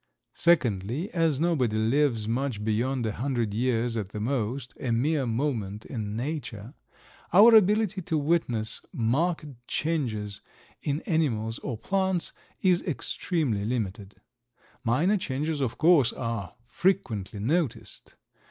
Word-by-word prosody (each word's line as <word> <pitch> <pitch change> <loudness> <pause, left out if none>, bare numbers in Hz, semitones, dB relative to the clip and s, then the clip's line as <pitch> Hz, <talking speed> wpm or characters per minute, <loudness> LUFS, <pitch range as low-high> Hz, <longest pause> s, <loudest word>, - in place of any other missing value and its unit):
Secondly, 125 - +1
as 165 -5 +1
nobody 145 -10 +1
lives 115 0 +2
much 120 -2 -1
beyond 120 +3 0
a 110 - 0
hundred 120 -2 -1
years 120 0 0
at 105 -4 -3
the 105 - -6
most—a 125 +1 -2
mere 135 +3 +1
moment 115 -5 -2
in 105 -5 -4
Nature—our 145 - +1
ability 210 -1 +4
to 160 -2 -1
witness 140 -8 0
marked 150 +9 0 0.2
changes 110 -11 -2 0.4
in 145 +2 -1
animals 115 -9 0
or 120 -5 -4
plants 190 - -1 0.3
is 180 -2 +3
extremely 145 - -1
limited. 105 -3 -3 0.7
Minor 150 - +2
changes, 150 -2 -2
of 125 -4 -1
course, 155 -7 +5
are 115 -7 -4
frequently 115 - -1
noticed. 145 - -2
130 Hz, 115 wpm, -27 LUFS, 110-160 Hz, 0.7 s, course